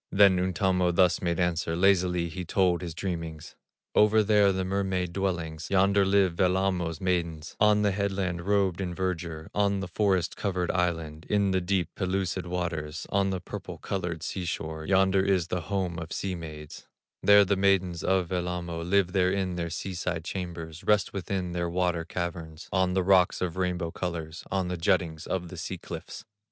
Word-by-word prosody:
Then 95 -2 +6
Untamo 90 0 +1
thus 90 0 +3
made 85 -1 -1
answer, 85 -2 0
Lazily 90 -1 +3
he 90 +3 -5
told 90 0 +1
his 85 -3 -6
dreamings: 85 -5 -5 0.4
"Over 105 +1 +5
there, 105 -1 +4
the 95 -1 -1
mermaid 95 -2 -1
dwellings, 85 -5 -2
Yonder 100 +1 +4
live 95 -3 +3
Wellamo's 90 -3 +1
maidens, 85 -4 -2
On 105 0 +4
the 100 - +3
headland 95 -3 -1
robed 100 -3 +2
in 90 -2 -3
verdure, 85 -4 -3
On 100 -1 +1
the 95 - -4
forest 95 -1 +1
covered 90 -3 -1
island, 80 -3 -2
In 100 -2 +2
the 95 0 +1
deep, 90 0 0
pellucid 95 -1 -2
waters, 85 -3 -3
On 100 0 +2
the 95 -1 -2
purple 90 - -7
colored 85 -4 -4
sea 95 - -3
shore; 80 -2 -4
Yonder 95 0 +4
is 95 -3 +1
the 90 - -1
home 90 -2 -2
of 80 -1 -7
sea 95 -1 -2
maids, 75 -3 -9 0.3
There 100 0 +7
the 100 +1 +2
maidens 95 -3 +2
of 95 -3 +1
Wellamo, 90 -2 -2
Live 90 +1 +2
there 90 -1 +3
in 95 -2 -1
their 85 -1 -3
sea 95 +3 -4
side 85 -1 -3
chambers, 85 -3 -6
Rest 105 -2 +2
within 95 -2 -3
their 85 0 -2
water 90 -1 0
caverns, 85 -2 -5
On 95 -1 +2
the 95 - +2
rocks 95 0 +4
of 90 -3 -2
rainbow 90 -2 -1
colors, 85 -3 -5
On 95 -1 0
the 90 0 -3
juttings 85 -2 0
of 90 -2 -2
the 90 - -9
sea 90 +3 -4
cliffs." 85 +5 -8
90 Hz, 175 wpm, -28 LUFS, 85-95 Hz, 0.4 s, There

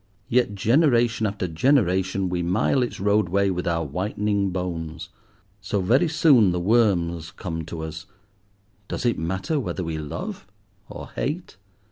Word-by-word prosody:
Yet, 120 -4 +2
generation 120 - +3
after 100 -2 -3
generation, 95 - +2
we 90 -1 -1
mile 95 +9 +1
its 120 - -3
roadway 100 -1 +2
with 90 -1 -3
our 85 -1 0
whitening 100 +5 -1
bones. 85 -3 -4 0.5
So 100 0 -1
very 120 - +3
soon 145 - +5
the 90 - -1
worms 85 -6 +1
come 80 -2 -5
to 80 0 -6
us; 80 +1 -7 0.8
does - - -4
it 120 - +1
matter 95 - -1
whether 100 -7 -3
we 80 -2 -3
love, 75 -2 -6 0.4
or - - -8
hate? 155 - -4
95 Hz, 140 wpm, -24 LUFS, 85-115 Hz, 0.8 s, soon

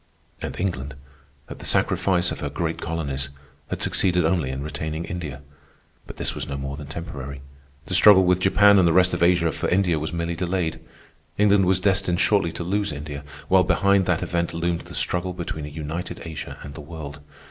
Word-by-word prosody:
And - - -5
England, 70 -7 -2 0.5
at - - -9
the - - -10
sacrifice 90 -2 +2
of - - -5
her 70 - -3
great 80 +3 -3
colonies, 70 -4 -2 0.4
had - - -3
succeeded 90 -3 +2
only 80 -5 +1
in 65 +1 -4
retaining 80 +2 -4
India. 75 -6 -6 0.6
But - - -10
this - - 0
was - - -5
no 70 - -4
more 70 0 -4
than 75 -1 -9
temporary. 70 -3 -7 0.4
The - - -5
struggle 100 -3 +8
with 90 0 +3
Japan 100 +2 +5
and 90 - +5
the 85 - +3
rest 90 +1 +4
of - - -2
Asia 85 -1 +4
for - - -2
India 90 -4 +2
was 80 - -3
merely 85 0 -2
delayed. 90 -1 -1 0.6
England 100 -2 +4
was 95 0 +3
destined 95 -2 +1
shortly 95 -3 +2
to 85 - -4
lose 100 +2 0
India, 75 0 -6 0.2
while 95 0 +5
behind 100 +1 +3
that 90 -3 +1
event 85 -1 -1
loomed 85 0 -1
the - - -10
struggle 90 +1 0
between 85 -4 -5
a - - -7
united 80 +3 -5
Asia 80 -2 -7
and 70 - -8
the 75 - -8
world. 75 -2 -8
85 Hz, 195 wpm, -24 LUFS, 75-90 Hz, 0.6 s, struggle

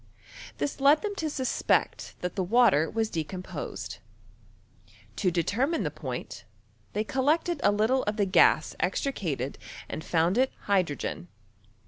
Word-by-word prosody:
This 285 - -3
led 285 +5 +5
them 415 -1 -2
to 320 -4 -1
suspect 260 -3 0
that 180 - -3
the 195 - 0
water 195 -6 +4
was 225 -1 0
decomposed. 155 - -5 1.2
To 185 - +2
determine 225 - 0
the - - -2
point, - - -6 0.5
they 210 - 0
collected 300 +7 +1
a - - +5
little 220 +6 +2
of 210 +1 -1
the 205 - +2
gms 180 -4 +4
'extricated 170 - -2 0.3
and 160 - -6
found 170 +7 +1
it 260 0 +3
hydrogen. 180 -3 -1
205 Hz, 130 wpm, -28 LUFS, 170-265 Hz, 1.2 s, led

